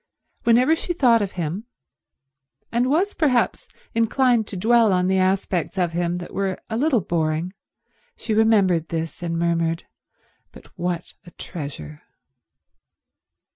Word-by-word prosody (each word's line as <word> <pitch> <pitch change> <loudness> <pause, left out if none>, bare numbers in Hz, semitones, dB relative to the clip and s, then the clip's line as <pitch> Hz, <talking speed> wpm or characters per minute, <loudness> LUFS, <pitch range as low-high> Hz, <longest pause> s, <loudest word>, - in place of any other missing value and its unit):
Whenever 250 +7 +5
she 350 +2 -3
thought 245 -8 +4
of 200 -2 -3
him, 175 +5 -4 1.1
and 240 +2 +1
was 365 +8 +1
perhaps 265 -7 +1 0.3
inclined 230 0 +2
to 195 - -6
dwell 225 +2 +4
on 180 -1 +2
the 190 +1 +2
aspects 185 -1 0
of 175 -2 +1
him 175 +1 -1
that 175 - -8
were 195 -1 -1
a - - -1
little 260 -2 +2
boring, 165 +1 -1 0.6
she 225 - -3
remembered 200 -7 +3
this 165 0 -4
and 165 -1 -2
murmured, 165 -1 0 0.7
"But - - -17
what 175 -1 -3
a - - -13
treasure." 140 - -8
190 Hz, 135 wpm, -22 LUFS, 170-230 Hz, 1.1 s, Whenever